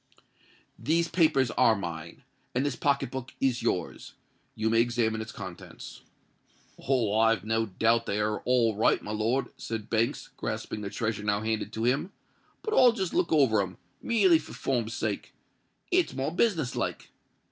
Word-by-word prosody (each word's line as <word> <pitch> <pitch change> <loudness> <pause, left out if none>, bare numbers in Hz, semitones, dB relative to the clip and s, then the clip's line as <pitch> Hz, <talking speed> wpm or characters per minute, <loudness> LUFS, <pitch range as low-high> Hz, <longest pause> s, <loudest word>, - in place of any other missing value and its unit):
"These 165 +2 +1
papers 135 -8 +3
are 110 - +4
mine; 85 -4 -7 0.3
and 130 +3 +1
this 145 - -1
pocket 140 -4 0
book 130 -1 -6
is 130 -3 +1
yours. 90 -7 -3 0.4
You 110 - -1
may 115 0 +5
examine 115 -2 0
its 110 - -7
contents." - - -9 0.8
"Oh! 120 -6 +1
I've 115 0 +3
no 110 0 0
doubt 115 +4 +1
they're 105 +1 0
all 120 -4 +2
right, 110 - +3
my 105 - -5
lord," 115 +4 0
said 110 -2 -6
Banks, 115 0 0
grasping 105 - -4
the 100 - -4
treasure 115 -1 -2
now 105 0 0
handed 110 -1 -2
to 110 - -3
him; 135 +10 +1 0.5
"but 435 - -2
I'll 250 - +6
just 190 -6 -3
look 180 - +1
over 130 -9 +4
'em—merely 165 - +1
for - - -11
form's 120 -3 -2
sake. - - -3 0.6
It's 360 -1 +2
more 135 +3 -1
business 170 - +1
like. - - -3
115 Hz, 160 wpm, -28 LUFS, 110-140 Hz, 0.8 s, I'll